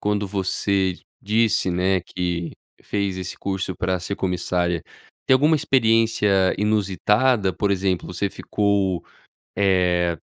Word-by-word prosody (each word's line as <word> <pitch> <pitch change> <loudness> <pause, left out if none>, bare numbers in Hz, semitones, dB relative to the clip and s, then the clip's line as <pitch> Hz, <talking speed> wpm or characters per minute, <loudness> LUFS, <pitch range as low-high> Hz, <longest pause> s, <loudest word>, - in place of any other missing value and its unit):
quando 105 0 0
você 95 -1 0 0.3
disse, 105 -3 +1
né, 90 +1 +1
que 85 -1 -4 0.3
fez 100 -2 -2
esse 90 -1 -5
curso 95 -1 -3
pra 95 -1 -1
ser 95 +3 -4
comissária, 90 -2 -1 0.4
tem 130 - +5
alguma 150 +4 +4
experiência 115 -7 +2
inusitada, 105 +1 +2
por 100 +4 -1
exemplo, 95 -2 0
você 90 +2 -2
ficou, 100 -4 0 0.5
eh, 90 -3 +2
95 Hz, 115 wpm, -22 LUFS, 90-105 Hz, 0.5 s, tem